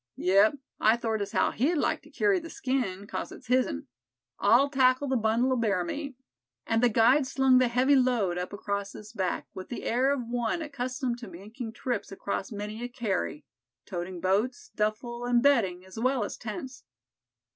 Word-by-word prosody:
"Yep, 195 +7 +4 0.2
I 220 +2 +4
thort 225 -2 -1
as 200 0 -3
how - - +2
he'd 285 +10 +1
like 300 - 0
to - - -18
kerry 405 -3 +2
the 330 -1 -9
skin, 245 - -2
'cause - - -5
it's - - -12
his'n; 250 - +1 0.5
I'll 240 +7 +5
tackle 265 0 +3
the 265 - +1
bundle 230 +3 +2
o' - - +2
bear 205 -7 +1
meat," 280 - -5 0.5
and 225 0 +1
the 245 - +5
guide 250 +5 +4
slung 265 -1 +4
the 255 - +4
heavy 255 +4 +3
load 235 -9 +2
up 180 - -4
across 200 -1 -3
his 215 +2 -11
back 190 -5 -2
with 185 - -8
the 240 - -5
air 255 +4 +2
of 265 -4 -1
one 240 +7 -1
accustomed 255 -3 -3
to 235 - -8
making 215 +6 -8
trips 235 -5 -3
across 195 +1 -4
many 210 +2 -5
a - - -2
carry, 210 - -2 0.4
toting 175 0 -5
boats, 220 - 0
duffle 235 +3 -2
and 245 0 +2
bedding, 190 -10 +3
as 190 +4 -9
well 255 0 +1
as - - -4
tents. 255 +4 -7
235 Hz, 185 wpm, -28 LUFS, 205-255 Hz, 0.5 s, I'll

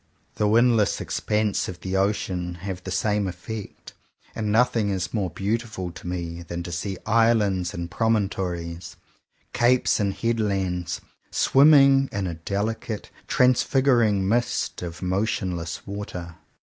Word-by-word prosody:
The 105 - 0
windless 115 -1 +3
expanses 105 -1 -1
of 90 - -8
the 95 0 -3
ocean 95 -3 -1
have 95 -2 -5
the 95 - -6
same 100 +3 0
effect; 95 +4 -7 0.4
and 105 -1 -2
nothing 115 -2 +3
is 95 -2 -2
more 100 -5 0
beautiful 100 -2 -3
to 90 +1 -10
me 85 -1 -4
than 85 0 -5
to 85 - -7
see 95 +3 -3
islands 105 -5 +2
and 85 0 -5
promontories, 90 -6 -1 0.6
capes 120 +1 +3
and 100 -2 +1
headlands, 100 -7 -1 0.3
swim 140 +3 +5
ming 135 -2 +6
in 100 -1 -2
a 90 - -2
delicate, 105 +6 -3 0.2
transfiguring 125 -5 +3
mist 120 +3 0
of 85 -2 -6
motionless 90 -3 -2
water. 95 -4 -6
100 Hz, 130 wpm, -24 LUFS, 90-115 Hz, 0.6 s, ming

